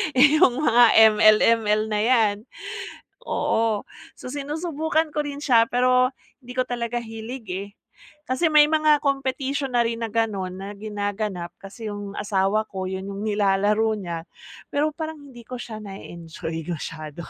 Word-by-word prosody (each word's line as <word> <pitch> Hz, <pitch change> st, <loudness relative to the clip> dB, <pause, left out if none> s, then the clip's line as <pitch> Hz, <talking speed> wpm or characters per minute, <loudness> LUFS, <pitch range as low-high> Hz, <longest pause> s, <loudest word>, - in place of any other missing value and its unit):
Yung 280 Hz, -1 st, +5 dB
mga 245 Hz, -5 st, +5 dB, 0.3 s
ML, 215 Hz, 0 st, +7 dB
ML 215 Hz, -2 st, +3 dB
na 210 Hz, -, 0 dB
yan. 225 Hz, -4 st, +3 dB, 0.9 s
Oo, 220 Hz, -2 st, 0 dB, 0.3 s
so, -, -, -10 dB
sinusubukan 310 Hz, +2 st, -1 dB
ko 300 Hz, -, 0 dB
rin 285 Hz, 0 st, -5 dB
siya 230 Hz, -5 st, +5 dB
pero, 255 Hz, +1 st, +3 dB, 0.3 s
hindi 250 Hz, 0 st, -9 dB
ko 255 Hz, -, +3 dB
talaga 240 Hz, -1 st, -2 dB
hilig, 225 Hz, +1 st, -8 dB
eh. 200 Hz, +2 st, -5 dB, 0.6 s
Kasi 260 Hz, +7 st, +1 dB
may 300 Hz, -1 st, +7 dB
mga 310 Hz, -1 st, +3 dB
competition 275 Hz, 0 st, -1 dB
na 240 Hz, -, +4 dB
rin 230 Hz, 0 st, -3 dB
na 225 Hz, -, -3 dB
gano'n, 205 Hz, -5 st, -1 dB
na 195 Hz, +1 st, -7 dB
ginaganap, 205 Hz, -3 st, -4 dB
kasi 205 Hz, +3 st, -9 dB
yung 205 Hz, -1 st, -6 dB
asawa 205 Hz, +1 st, +1 dB
ko, 190 Hz, -1 st, -5 dB
'yon 190 Hz, +1 st, -5 dB
yung 200 Hz, +1 st, -5 dB
nilalaro 210 Hz, +1 st, +2 dB
niya, 170 Hz, -4 st, -5 dB, 0.5 s
pero, 295 Hz, +2 st, +1 dB
parang 315 Hz, 0 st, -6 dB
hindi 240 Hz, -, -13 dB
ko 255 Hz, -, -6 dB
siya 220 Hz, -3 st, -7 dB
na-e-enjoy 165 Hz, -4 st, -7 dB
masyado. 155 Hz, -1 st, -6 dB
225 Hz, 150 wpm, -24 LUFS, 200-260 Hz, 0.9 s, ML